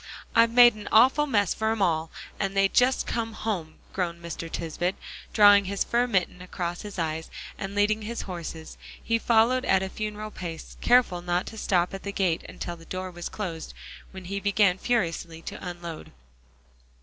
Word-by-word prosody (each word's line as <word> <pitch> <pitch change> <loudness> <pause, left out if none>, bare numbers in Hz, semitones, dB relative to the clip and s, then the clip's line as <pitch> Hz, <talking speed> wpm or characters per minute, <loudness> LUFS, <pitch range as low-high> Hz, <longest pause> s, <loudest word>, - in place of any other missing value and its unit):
"I've 230 0 +6
made 240 0 +7
an 210 -1 -8
awful 265 +6 +5
mess 205 -8 +2
for 220 0 -1
'em 225 - -2
all, 165 -4 +1 0.3
and 195 0 -2
they 195 0 +5
just 250 +5 +2
come 225 -1 -2
home," 185 -8 -3 0.2
groaned 170 -2 -2
Mr. 170 -1 -6
Tisbett; 175 +3 -2 0.4
drawing 205 -2 +7
his 200 +1 -1
fur 240 +1 +1
mitten 185 -5 0
across 175 -1 -4
his 205 -2 -8
eyes, 160 -1 -2 0.3
and 195 0 -6
leading 210 +1 +2
his 230 +2 -4
horses, 170 -3 -7 0.2
he 230 0 +1
followed 235 +3 +3
at 190 -6 +3
a 190 - -3
funeral 215 +1 -5
pace, 170 -5 -7
careful 240 -8 +4
not 175 +1 -1
to - - -8
stop 180 -3 +1
at 195 - -6
the 200 - -4
gate 185 -5 0
until 175 - -6
the 165 -1 -15
door 185 +1 -5
was 175 0 -6
closed, 170 -6 -6 0.3
when 190 -1 -10
he 200 +2 -3
began 200 -2 +2
furiously 170 -8 -1
to - - -7
unload. 175 -3 -7
195 Hz, 180 wpm, -26 LUFS, 175-220 Hz, 0.4 s, made